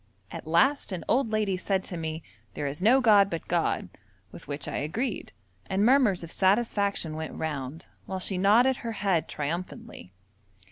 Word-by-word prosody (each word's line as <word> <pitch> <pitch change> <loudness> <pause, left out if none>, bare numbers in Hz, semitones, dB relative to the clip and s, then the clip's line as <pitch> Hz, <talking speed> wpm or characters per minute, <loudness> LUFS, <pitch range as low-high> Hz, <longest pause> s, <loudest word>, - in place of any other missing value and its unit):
At - - -8
last 260 - +2
an 175 -4 -4
old 250 -1 +2
lady 215 -3 0
said 190 +1 -1
to 180 - -6
me, 160 -1 -4 0.3
'There 145 - -3
is 145 +4 -4
no 245 +7 +5
god 205 -4 +5
but 165 -3 -5
God!' 170 - 0 0.4
with - - -12
which 145 0 -4
I - - -3
agreed, 205 - -3 0.4
and 195 +2 +1
murmurs 240 -8 +3
of 165 - -8
satisfaction 200 -4 +1
went 160 0 -6
round, 150 -1 -5 0.2
while 190 - -3
she 185 0 0
nodded 235 +7 +4
her 230 -1 -5
head 195 -5 0
triumphantly. 170 - -6
190 Hz, 170 wpm, -27 LUFS, 160-220 Hz, 0.4 s, no